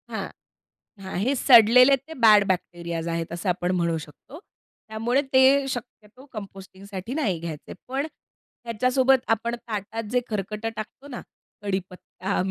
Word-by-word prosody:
हां. -, -, -4 dB, 0.7 s
हां. 190 Hz, -1 st, -8 dB
हे 265 Hz, +3 st, +1 dB
सडलेले 250 Hz, +2 st, +7 dB
ते 275 Hz, +5 st, -14 dB
बॅड 210 Hz, -2 st, +7 dB
बॅक्टेरियाज 170 Hz, -2 st, -3 dB
आहेत 165 Hz, 0 st, -3 dB
असं 175 Hz, +3 st, -4 dB
आपण 175 Hz, 0 st, -1 dB
म्हणू 170 Hz, -1 st, 0 dB
शकतो. 160 Hz, -, -12 dB, 0.5 s
त्यामुळे 235 Hz, +5 st, 0 dB
ते 260 Hz, -, +7 dB, 0.3 s
शक्यतो 245 Hz, 0 st, -8 dB
कंपोस्टिंगसाठी 195 Hz, +1 st, -8 dB
नाही 210 Hz, -, 0 dB
घ्यायचे. 160 Hz, -3 st, -7 dB
पण 270 Hz, +3 st, -2 dB, 0.6 s
ह्याच्यासोबत 255 Hz, +3 st, +2 dB, 0.2 s
आपण 235 Hz, +2 st, -4 dB
ताटात 220 Hz, 0 st, -4 dB
जे 250 Hz, -, +2 dB
खरकटं 210 Hz, +1 st, -3 dB
टाकतो 220 Hz, +6 st, -8 dB
ना 250 Hz, -, -7 dB, 0.4 s
कढीपत्ता, 190 Hz, -1 st, -4 dB
210 Hz, 130 wpm, -24 LUFS, 185-250 Hz, 0.7 s, सडलेले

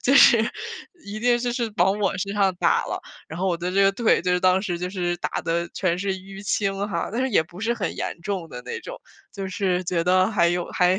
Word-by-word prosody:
就 270 Hz, -, +3 dB
是 240 Hz, -3 st, +8 dB, 0.7 s
一 210 Hz, +2 st, -6 dB
定 240 Hz, 0 st, +3 dB
这 240 Hz, 0 st, -1 dB
是 235 Hz, -2 st, -2 dB
往 190 Hz, +3 st, +3 dB
我 195 Hz, -3 st, +1 dB
身 200 Hz, +1 st, -2 dB
上 200 Hz, -2 st, +2 dB
打 -, -, +3 dB
了， -, -, -3 dB, 0.3 s
然 160 Hz, -, -7 dB
后 190 Hz, -, 0 dB
我 175 Hz, -3 st, +1 dB
的 175 Hz, +1 st, -2 dB
这 195 Hz, +2 st, +3 dB
个 195 Hz, 0 st, +5 dB
腿， 225 Hz, +3 st, +2 dB
就 180 Hz, -, +1 dB
是 180 Hz, -, +2 dB
当 185 Hz, +1 st, +4 dB
时 175 Hz, -4 st, -2 dB
就 180 Hz, +1 st, -3 dB
是 175 Hz, -2 st, -2 dB
打 -, -, -2 dB
得 170 Hz, 0 st, -1 dB
全 180 Hz, -2 st, 0 dB
是 195 Hz, 0 st, -1 dB
淤 195 Hz, +1 st, -10 dB
青 200 Hz, 0 st, -1 dB
哈， 170 Hz, -4 st, -2 dB
但 235 Hz, -, -1 dB
是 260 Hz, -, +1 dB
也 205 Hz, -9 st, +3 dB
不 175 Hz, +4 st, -13 dB
是 230 Hz, +2 st, 0 dB
很 190 Hz, -7 st, -3 dB
严 -, -, -4 dB
重 190 Hz, -4 st, -3 dB
的 125 Hz, -4 st, -8 dB
那 -, -, -5 dB
种。 -, -, -8 dB, 0.4 s
就 195 Hz, -1 st, -5 dB
是 185 Hz, -1 st, 0 dB
觉 170 Hz, -1 st, 0 dB
得 185 Hz, +2 st, +3 dB
还 170 Hz, -5 st, +3 dB
有 175 Hz, 0 st, 0 dB
还 180 Hz, +1 st, +3 dB
190 Hz, 275 characters per minute, -24 LUFS, 175-205 Hz, 0.7 s, 是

